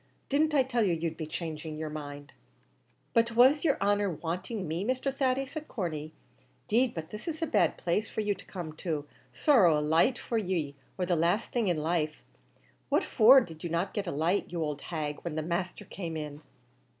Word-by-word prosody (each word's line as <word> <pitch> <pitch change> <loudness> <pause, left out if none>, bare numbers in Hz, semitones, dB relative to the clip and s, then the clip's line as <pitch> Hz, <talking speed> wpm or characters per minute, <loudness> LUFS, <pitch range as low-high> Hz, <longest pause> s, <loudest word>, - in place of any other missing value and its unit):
Didn't 300 +2 +2
I 270 - +5
tell 250 -2 0
you 195 -5 +3
you'd 165 0 -2
be 160 -1 -5
changing 155 -1 -5
your 155 -1 -4
mind?" 145 -1 -7 0.8
"But 230 -1 +2
was 260 +5 +6
yer 295 -5 +3
honer 205 0 +2
wanting 180 +4 -4
me, 165 +4 -2
Mr. 260 +4 -1
Thady," 270 0 +1
said 305 +3 -7
Corney; 155 - -4 0.6
"'deed 245 +3 +2
but 160 -1 -6
this 210 +10 -8
is 320 0 -3
a - - +3
bad 320 - +2
place 195 +5 0
for - - -2
you 210 -1 +1
to 195 - -14
come 170 -5 -6
to; 155 -5 -2 0.3
sorrow 195 - +5
a - - +2
light 160 - +3
for 230 - -1
ye 175 -8 -1 0.2
or 185 - 0
the 175 0 +1
laste 170 +7 +1
thing 235 -4 +1
in 175 -3 +2
life; 155 -1 -1 0.7
what - - +3
for 255 +3 +7
did 160 -8 -9
you 170 - -2
not 170 +4 -1
get 205 -3 -2
a - - -1
light, 165 +8 0
you 170 -2 -1
ould 150 -1 -4
hag, 150 -3 -4
when 170 -3 -4
the 155 - -1
masther 175 +2 -3
came 165 -4 -5
in?" 150 -1 -6
175 Hz, 205 wpm, -30 LUFS, 155-230 Hz, 0.8 s, for